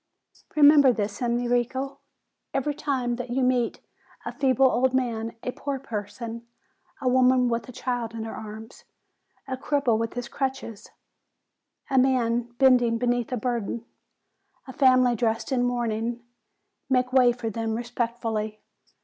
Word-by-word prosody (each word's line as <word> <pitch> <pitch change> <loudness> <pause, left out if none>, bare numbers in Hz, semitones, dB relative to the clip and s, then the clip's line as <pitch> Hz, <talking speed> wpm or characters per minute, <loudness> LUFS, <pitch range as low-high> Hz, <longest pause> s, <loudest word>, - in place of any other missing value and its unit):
Re 300 - +3
member 285 -2 +8
this, 205 -2 -3
Enrico. 245 +3 -1 0.6
Every 275 +2 0
time 265 -5 -2
that 250 0 -5
you 255 +2 0
meet 250 -2 +1 0.4
a - - -3
feeble 270 -2 +3
old 260 0 +3
man, 230 -3 -1
a 250 - -2
poor 280 +1 -4
person, 230 -1 -6 0.5
a 260 - -2
woman 255 0 +4
with 235 +1 -2
a - - -6
child 240 -2 -3
in 225 - -4
her 225 - -6
arms, 220 +2 -9 0.6
a 260 - -2
cripple 260 -4 +1
with 230 +1 -3
his 245 -1 -4
crutches, 265 -6 -4 1.0
a 265 - +4
man 240 -2 +1
bending 245 -3 +4
beneath 245 0 0
a 250 - -1
burden, 235 -1 -3 0.8
a 260 - -8
family 255 -2 +4
dressed 225 +1 -1
in 255 -2 +2
mourning, 240 -1 -1 0.7
make 255 -1 +1
way 250 -2 +6
for 235 -2 -4
them 225 +1 -2
respectfully. 230 -2 -3
245 Hz, 140 wpm, -25 LUFS, 230-260 Hz, 1.0 s, member